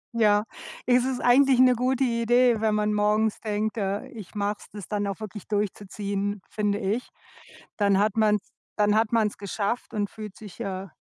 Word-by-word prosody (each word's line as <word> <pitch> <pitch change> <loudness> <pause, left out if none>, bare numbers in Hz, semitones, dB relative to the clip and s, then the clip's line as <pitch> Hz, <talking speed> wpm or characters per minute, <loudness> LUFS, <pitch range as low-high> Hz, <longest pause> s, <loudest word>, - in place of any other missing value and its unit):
Ja. 210 -2 +4 0.4
Ist 250 0 +3
es 260 -1 -2
eigentlich 260 +1 +5
'ne 255 0 +7
gute 255 +2 +1
Idee, 240 -1 +3
wenn 220 -1 +2
man 210 0 +1
morgens 210 +1 +1
denkt: 215 +1 -2
„Äh, 200 +2 -2
ich 220 -7 -11
mache 205 0 0
es“, - - -15
das 205 -5 -9
dann 205 -1 -1
auch 195 -2 -4
wirklich 215 -2 -8
durchzuziehen, 205 0 -2
finde 210 -1 0
ich. 215 +4 -2 0.7
Dann 200 -2 +3
hat 210 0 +2
man 215 -1 +4 0.4
dann 210 0 +3
hat 220 0 +2
man's 220 -3 +1
geschafft 205 +3 -3
und 205 -2 -1
fühlt 210 -2 -9
sich, 210 -4 -11
äh, 190 0 -4
210 Hz, 180 wpm, -26 LUFS, 205-230 Hz, 0.7 s, ne